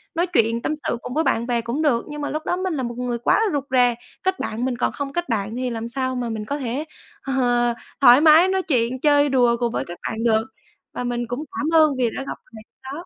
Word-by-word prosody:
nói 345 +2 +1
chuyện 230 -4 +2
tâm 305 - -1
sự 255 -5 -3
cùng - - -6
với 320 +3 +1
bạn 235 -4 0
bè 240 -2 0
cũng 235 +7 -3
được, 250 -7 +1
nhưng 295 0 -6
mà 290 - -2
lúc 310 +1 -4
đó 355 - 0
mình 370 -2 -2
là 265 - -2
một 240 0 -5
người 245 -1 -2
quá 240 - +2
là 440 -4 +1
rụt 285 - 0
rè. 245 -2 +4 0.3
Kết 375 0 0
bạn 230 +4 -3
mình 250 -2 -2
còn - - 0
không 280 -1 -5
kết 345 -3 -3
bạn 215 0 -2
thì 250 0 -2
làm 230 -1 -4
sao 260 +1 -2
mà 245 -2 -2
mình 215 -1 -4
có 285 +4 -3
thể, 260 +4 -3 0.4
ờ, 270 - -4 0.7
thoải 250 +2 +8
mái 320 +3 +7
nói 380 0 +1
chuyện 250 -4 0
chơi 290 0 +4
đùa 245 -3 +3
cùng 240 -1 0
với - - -2
các 175 - -8
bạn 225 +1 -4
được. 220 -1 +2 0.5
Và 250 - -4
mình 240 -1 -2
cũng 245 +6 -4
cảm 300 - -1
ơn 310 - +4
vì 245 -3 +2
đã 270 - -3
gặp - - -5 0.2
thầy 220 - -10
lúc - - -75 0.2
đó. 345 - -8
250 Hz, 270 wpm, -22 LUFS, 235-295 Hz, 0.7 s, thoải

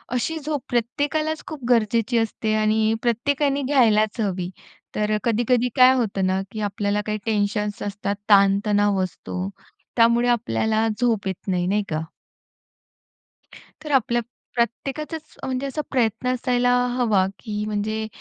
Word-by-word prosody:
अशी 320 +6 -1
झोप 295 -1 -3
प्रत्येकालाच 290 +6 -1
खूप 300 -5 -8
गरजेची 230 0 +2
असते 220 -1 -1
आणि 215 +1 +2
प्रत्येकाने 275 +4 +1
घ्यायलाच 230 -5 +3
हवी. 185 -3 -2 0.5
तर 215 0 +1
कधी-कधी 240 +2 +2
काय 255 0 +7
होतं 200 -6 0
ना, 190 +1 +1
की 220 - -6
आपल्याला 205 0 -1
काही 215 0 -1
टेन्शन्स 210 -1 -1
असतात, 200 0 -3
ताणतणाव 200 0 +4
असतो 185 +1 -5 0.5
त्यामुळे 235 +1 +4
आपल्याला 220 -1 +1
झोप 225 -5 +1
येत 190 +1 -5
नाही, 180 -1 0
नाही 205 +2 +1
का. 155 0 -1 1.8
तर 305 - -6
आपल्या 250 -3 +2 0.3
प्रत्येकाचाच, 275 +6 -2 0.2
अ, - - -3
म्हणजे 260 +1 -2
असा 290 +3 -3
प्रयत्न 240 -1 0
असायला 245 0 +1 0.3
हवा, 215 -7 +3
की 210 -2 -4
म्हणजे 215 +1 -2
225 Hz, 130 wpm, -23 LUFS, 205-250 Hz, 1.8 s, काय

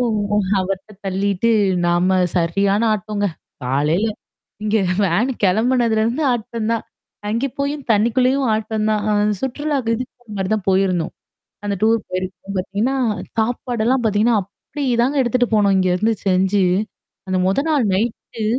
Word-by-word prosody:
ஓ! - - +2 0.6
அவர்ட்ட 190 +2 -3
தள்ளிட்டு, 195 +2 0 0.4
நாம 180 +2 +2 0.2
சரியான 195 +5 +2
ஆட்டம்ங்க. 210 0 -1 0.4
காலையில 150 - +1 0.6
இங்க 215 +1 +1 0.3
வேன் 195 +8 +2
கிளம்புனதுலருந்து 230 +4 +2
ஆட்டம் 230 -1 -3
தான். 230 - -2 0.4
அங்க 230 +6 0
போயும் 280 0 -2
தண்ணிக்குள்ளேயும் 250 +5 +2
ஆட்டம் 215 0 -2
தான். 210 -1 +1
அ - - +2 0.3
சுற்றுலாக்கு 265 -2 -1
இதுக்கு 250 +2 -5
போற 245 - -28
மாரி 190 -1 -1
தான் 210 -3 -4
போயிருந்தோம். 185 -3 +1 0.5
அந்த 205 -1 -1
டூர் 225 +1 +4
போயிருக்கோம் 185 +1 -5
பார்த்தீங்கன்னா 210 +8 -1 0.4
சாப்பாடெல்லாம் 240 +2 0
பார்த்தீங்கன்னா, 220 +2 +3
அப்டி 240 +9 -8 0.2
தாங்க 275 +3 +1
எடுத்துட்டு 245 0 +1
போனோம் 200 -2 +4
இங்கருந்து 185 +4 +2
செஞ்சு. 190 +1 +3 0.6
அந்த 185 -1 +1
மொத 195 +10 +1
நாள் 285 -7 +2
நைட்டு 220 +1 -3
215 Hz, 130 wpm, -20 LUFS, 190-240 Hz, 0.6 s, டூர்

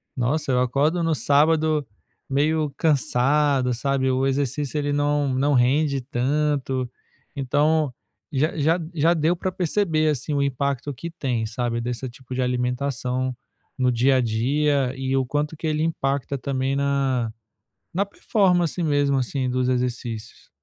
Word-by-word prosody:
nossa, 140 +4 0
eu 125 0 +3
acordo 145 +7 +1
no 165 -1 +2
sábado 155 0 +2 0.4
meio 150 +2 +1
cansado, 140 -3 +2
sabe, 135 +1 0
o 130 +1 +1
exercício 140 +1 -1
ele 145 -1 0
não, 145 -1 +1
não 140 +3 +2
rende 140 +3 +3
tanto, 135 0 -1 0.5
então, 145 +2 +1 0.4
já 150 +3 0
já 160 +4 +2
já 165 +1 +3
deu 165 +1 +1
para 185 +2 -3
perceber 170 -3 +1
assim 150 +1 -2
o 140 - +1
impacto 140 +1 -1
que 165 +7 -7
tem, 125 -9 -2
sabe, 120 0 -2
desse 120 +2 -3
tipo 125 +1 -11
de 130 - 0
alimentação 125 0 -1 0.4
no 130 -1 +2
dia 130 +3 +3
a - - +3
dia 130 +4 +1
e 135 0 -1
o 135 - +1
quanto 150 +4 -2
que 160 - -6
ele 155 0 0
impacta 140 -3 -1
também 135 0 -1
na 135 -5 0 0.6
na 195 +4 +1
performance 180 -4 +1
mesmo, 145 -3 +2
assim, 130 0 -1
dos 125 0 0
exercícios. 125 -3 -3
140 Hz, 145 wpm, -23 LUFS, 125-150 Hz, 0.6 s, eu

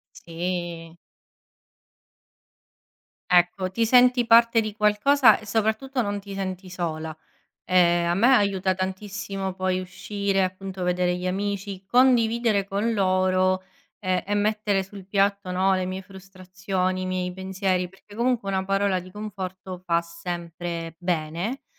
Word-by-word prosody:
Sì. 170 -1 -5 2.4
Ecco, 180 +1 +3
ti 230 +3 +1
senti 250 +1 +5
parte 230 0 +6
di 215 -2 -3
qualcosa 220 +3 +4
e, 215 - -13
soprattutto, 225 +5 0
non 205 -2 -2
ti 200 0 -9
senti 185 -1 -5
sola. 160 -3 -4 0.5
Ehm, 175 -1 +3
a 170 - +2
me 225 +7 +4
aiuta 195 -3 +2
tantissimo 190 0 -4
poi 185 0 -1
uscire, 195 +2 -2
appunto, 185 0 -4
vedere 180 0 +1
gli 180 0 -4
amici, 195 0 -3
condividere 235 -3 +3
con 205 +3 -1
loro, 185 -1 +2 0.4
ehm, 185 -3 -1
e 205 +1 -2
mettere 210 -1 +1
sul 195 0 -11
piatto, 200 -1 +1
no, 190 +1 +2
le 185 -1 0
mie 185 +1 -4
frustrazioni, 185 0 -4
i - - -3
miei 180 -1 -2
pensieri, 190 -1 -1
perché, 200 +2 -18
comunque, 235 -2 0
una 190 -1 0
parola 195 0 +1
di 180 +1 -10
conforto 190 -2 -7
fa 170 -1 +2
sempre 170 -1 -6
bene. 175 - -2
190 Hz, 130 wpm, -25 LUFS, 180-205 Hz, 2.4 s, parte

